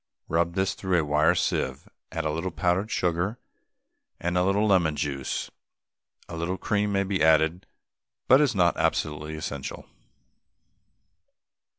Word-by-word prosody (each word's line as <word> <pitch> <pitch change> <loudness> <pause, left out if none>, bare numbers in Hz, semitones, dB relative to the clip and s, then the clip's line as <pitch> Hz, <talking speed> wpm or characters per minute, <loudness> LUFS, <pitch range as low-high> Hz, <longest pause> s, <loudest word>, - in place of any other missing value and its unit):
Rub 85 +1 0
this 95 0 +1
through 95 -2 0
a 80 - 0
wire 75 +1 +3
sieve, - - -1 0.2
add 80 -1 -3
a 75 - 0
little 80 +4 -2
powdered 90 +4 0
sugar 90 +5 -1 0.8
and 90 +1 -2
a 90 - +3
little 100 +3 +2
lemon 90 -7 +3
juice; 70 -2 -3 0.8
a 85 - -7
little 85 +3 -2
cream 105 +1 0
may 100 0 +1
be 95 -2 -2
added, 80 +2 +3 0.6
but 130 +3 +7
is 140 -6 +2
not 90 -2 +3
absolutely 75 0 -1
essential. 70 -4 -6
85 Hz, 135 wpm, -26 LUFS, 80-95 Hz, 0.8 s, but